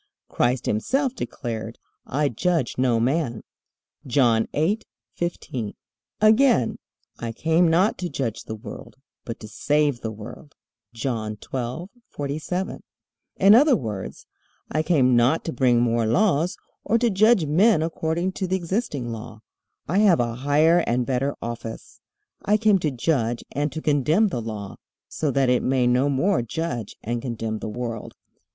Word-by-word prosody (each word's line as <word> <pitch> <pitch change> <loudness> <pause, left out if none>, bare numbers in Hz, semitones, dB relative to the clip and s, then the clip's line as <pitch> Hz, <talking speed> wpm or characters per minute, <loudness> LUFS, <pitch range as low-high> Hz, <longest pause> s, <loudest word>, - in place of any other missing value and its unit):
Christ 125 +1 0
himself 260 - 0
declared: 115 - -5 0.3
"I 145 +2 +1
judge 160 - 0
no 125 -3 +3
man." 125 -1 0 0.6
(John 120 -4 +3
8:15.) 160 - -3 0.4
Again, 215 - +4 0.4
"I 115 -1 -4
came 160 +8 +2
not 180 +7 +2
to 180 -1 -3
judge 120 -8 -3
the 110 - -5
world, 105 -1 -10 0.3
but 115 - -6
to 110 - -8
save 145 +2 0
the 110 - -3
world." 110 +7 -10 0.4
(John 115 -3 -3
12:47.) 155 - -5 0.6
In 195 +2 +6
other 270 +4 +6
words: 105 - -5 0.5
"I 155 - +1
came 140 -7 +3
not 120 +7 +3
to 165 - -3
bring 120 -3 +3
more 115 -1 +1
laws, 175 - +2 0.3
or 225 +3 +2
to 235 -1 +2
judge 205 -2 +4
men 170 +4 +4
according 165 +2 -1
to 190 0 -3
the 185 - 0
existing 175 - -2
Law. 110 -1 -8 0.5
I 185 +6 +1
have 200 -5 +5
a 120 -1 0
higher 145 +7 +3
and 120 +1 +1
better 135 +2 -1
office. 115 -1 -7 0.4
I 210 +1 +3
came 210 -2 +3
to 155 - 0
judge 120 -3 -1
and 145 +1 -1
to 160 - -6
condemn 155 - +3
the 125 -9 -3
Law, 105 -3 -6 0.3
so 155 - -2
that 135 -1 +2
it 125 - +3
may 130 -1 +1
no 125 +3 +3
more 145 +5 +2
judge 120 -3 -4
and 120 +1 -2
condemn 115 -3 -3
the 110 - -5
world." 115 0 -5
140 Hz, 145 wpm, -24 LUFS, 120-175 Hz, 0.6 s, In